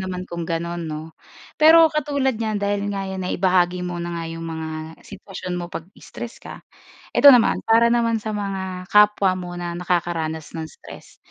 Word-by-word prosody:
naman 185 -1 -4
kung 170 -2 -6
gano'n 170 0 -3
'no. 155 +1 -7 0.5
Pero 320 0 +7
katulad 285 -3 0
niyan 220 -2 -2
dahil 200 0 -1
nga 195 -1 -3
yan 190 0 -5
naibahagi 180 -1 +1
mo 175 -1 -4
na 170 0 -4
nga 165 - -4
yung 165 0 -6
mga 160 0 -6
sitwasyon 190 -2 -7
mo 175 - -6
'pag 165 - -6 0.2
stress 240 0 -9
ka, - - -11 0.5
ito - - 0
naman, 240 -2 +4
para 230 +1 +5
naman 230 -2 +1
sa 215 - -5
mga 190 -2 -4
kapwa 210 -2 +5
mo 175 -1 -6
na 175 -1 -4
nakakaranas 170 -3 -2
ng 160 -1 -5
stress, - - -14
185 Hz, 175 wpm, -22 LUFS, 170-210 Hz, 0.5 s, Pero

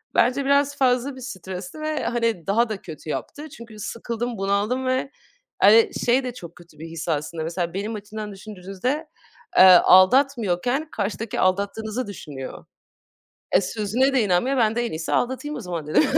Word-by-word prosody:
bence 270 +3 +3
biraz 280 0 +2
fazla 260 0 +1
bir 260 - -11
stresti 190 - -7
ve, 310 0 -2
hani, 230 -8 -1
daha 230 +4 +2
da 210 -3 -4
kötü 160 -2 -10
yaptı. 300 - -5
Çünkü 235 -7 -12
sıkıldım, 235 +2 -4
bunaldım 205 +7 0
ve, 260 +1 0 0.5
hani, 220 +3 +6
şey 250 +2 +3
de 250 - -4
çok 170 -8 -11
kötü 170 -3 -18
bir 165 - -7
his 165 +1 -6
aslında, 155 +1 -2
mesela 170 +1 -3
benim 210 +3 -3
açımdan 210 0 -7
düşündüğünüzde, 200 - -4 0.5
eee, - - +9
aldatmıyorken 225 - +5
karşıdaki 210 +1 -3
aldattığınızı 205 +5 -1
düşünüyor. 145 -9 -8 0.9
E, - - +5
sözüne 220 +7 0
de 260 - +3
inanmıyor, 205 +8 +1
ben 225 -2 +2
de 240 0 0
en - - -6
iyisi 160 +1 -4
aldatayım 260 +4 -1
o - - -5
zaman 175 -7 -5
dedim. 155 - +4
215 Hz, 165 wpm, -23 LUFS, 185-255 Hz, 0.9 s, eee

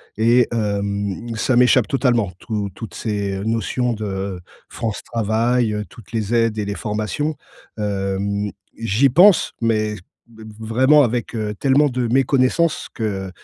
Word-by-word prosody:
et 115 +2 +4
hem, 100 0 -2
ça 120 +3 +1
m'échappe 125 -1 +4
totalement. 120 -8 +1
Tout 105 -3 -3
toutes 115 - -8
ces 100 -3 -3
notions 115 +2 0
de 100 -3 -4 0.3
France 110 -3 -4
Travail, 115 +1 0
heu, 105 0 -3
toutes 115 -5 -15
les 110 0 -1
aides 115 -2 +1
et 105 - -1
les 100 0 -3
formations, 110 - -2 0.4
hem, 100 0 -2 0.3
j'y 115 +5 +2
pense, 180 +7 +5
mais 110 -2 0 0.3
b 115 -1 -16 0.2
vraiment 130 +7 +4
avec, 120 -1 -2
heu, 105 -1 -2
tellement 140 +2 +3
de 125 -2 -1
méconnaissance 135 +5 +2
que, 100 -4 -3
110 Hz, 140 wpm, -20 LUFS, 105-125 Hz, 0.4 s, pense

